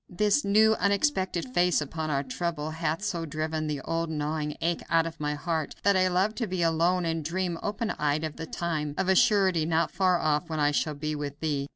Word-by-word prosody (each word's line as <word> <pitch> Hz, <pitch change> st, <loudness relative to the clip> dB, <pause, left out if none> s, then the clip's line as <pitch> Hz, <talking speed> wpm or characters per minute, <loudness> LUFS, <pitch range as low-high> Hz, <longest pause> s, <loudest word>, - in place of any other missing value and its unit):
"This 210 Hz, +9 st, +2 dB
new, 215 Hz, +2 st, +5 dB
unexpected 200 Hz, -, 0 dB
face 175 Hz, -3 st, +3 dB
upon 155 Hz, +2 st, -4 dB
our 140 Hz, -2 st, 0 dB
trouble 155 Hz, +2 st, -3 dB
hath 160 Hz, +3 st, -2 dB
so 175 Hz, -5 st, -2 dB
driven 155 Hz, 0 st, -3 dB
the 150 Hz, -2 st, -3 dB
old 165 Hz, +2 st, -2 dB
gnawing 150 Hz, -1 st, -2 dB
ache 170 Hz, +1 st, -1 dB
out 165 Hz, -1 st, +3 dB
of 165 Hz, -2 st, -6 dB
my 150 Hz, 0 st, -1 dB
heart 160 Hz, 0 st, -2 dB
that 200 Hz, 0 st, +4 dB
I 185 Hz, 0 st, +4 dB
love 185 Hz, +4 st, +1 dB
to 230 Hz, -, -1 dB
be 180 Hz, -2 st, -1 dB
alone, 170 Hz, +2 st, +2 dB
and 165 Hz, -1 st, -1 dB
dream, 175 Hz, +1 st, -2 dB
open 210 Hz, +2 st, -2 dB
eyed, 150 Hz, +1 st, +1 dB
of 155 Hz, -2 st, -4 dB
the 165 Hz, -, -6 dB
time, 155 Hz, -4 st, -3 dB
of 190 Hz, 0 st, 0 dB
a 190 Hz, -, +5 dB
surety 195 Hz, -7 st, +4 dB
not 165 Hz, +1 st, +1 dB
far 185 Hz, -1 st, +2 dB
off, 155 Hz, +1 st, 0 dB
when 160 Hz, -1 st, -2 dB
I 145 Hz, 0 st, +3 dB
shall 150 Hz, +1 st, -1 dB
be 150 Hz, +1 st, -3 dB
with 145 Hz, -1 st, -5 dB
thee.... 145 Hz, -3 st, -2 dB
165 Hz, 220 wpm, -27 LUFS, 155-185 Hz, -, new